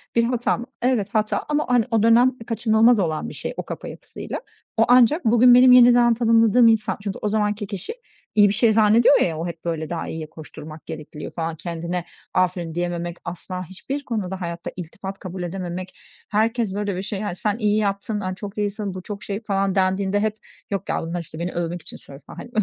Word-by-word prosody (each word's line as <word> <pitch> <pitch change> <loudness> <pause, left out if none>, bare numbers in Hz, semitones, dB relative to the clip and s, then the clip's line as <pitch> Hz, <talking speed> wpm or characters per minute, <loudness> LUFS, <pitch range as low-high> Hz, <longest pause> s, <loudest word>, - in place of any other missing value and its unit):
bir 235 - +4
hata 240 0 0
mı? 240 - -6 0.2
Evet, 240 -5 +1
hata 215 -1 0
ama, 300 0 +1
hani, 245 -3 +3
o 225 -2 +2
dönem 240 +3 +5
kaçınılmaz 225 0 +4
olan 160 -5 -1
bir - - -9
şey, - - -5
o - - -3
kafa - - -7
yapısıyla. - - -7 0.4
O 225 - +5
ancak 250 +5 +5
bugün 240 +2 +6
benim 250 +1 +8
yeniden 245 -1 +7
tanımladığım 230 0 +4
insan, 225 -1 +2
çünkü 200 -2 -4
o - - -1
zamanki 210 0 0
kişi 200 - -5 0.4
iyi 205 -1 +7
bir - - 0
şey 225 +1 +3
zannediyor 220 +5 +5
ya, 165 -3 0
o 165 - -3
hep, 170 -1 -8
böyle, 160 -2 -3
daha 170 -1 -4
iyiye 160 -1 -6
koşturmak 155 0 -11
gerekli 155 -2 -8
diyor - - -6
falan, 165 -1 -3
kendine 170 +1 -4 0.3
aferin 175 -3 0
diyememek, 175 0 -3
asla 180 +1 -5
hiçbir 265 - -6
konuda 190 -5 -3
hayatta 170 -1 -5
iltifat 190 +3 -7
kabul 185 -1 -6
edememek. 180 +1 -5 0.3
Herkes, 225 0 +1
böyle, 205 -2 -2
bir 185 - -3
şey, 200 0 -4
hani, 205 -4 -3
sen 210 +3 -1
iyi 210 -2 +1
yaptın, 205 0 -1
aaa, 185 -2 -3
çok 200 +2 -8
iyisin, 205 -1 -2
bu 185 - -6
çok 205 +1 -7
şey 200 0 -4
falan 195 -2 0
dendiğinde 190 +1 +1
hep, 215 0 0 0.4
yok 195 -2 -3
ya, - - 0
bunlar, 170 +1 -4
işte, 160 -1 -10
beni 175 +1 -2
övmek 175 0 -3
için 160 - -10
söylüyor, 140 +1 -14
falan, - - -11
hani, - - -8
200 Hz, 205 wpm, -22 LUFS, 175-225 Hz, 0.4 s, benim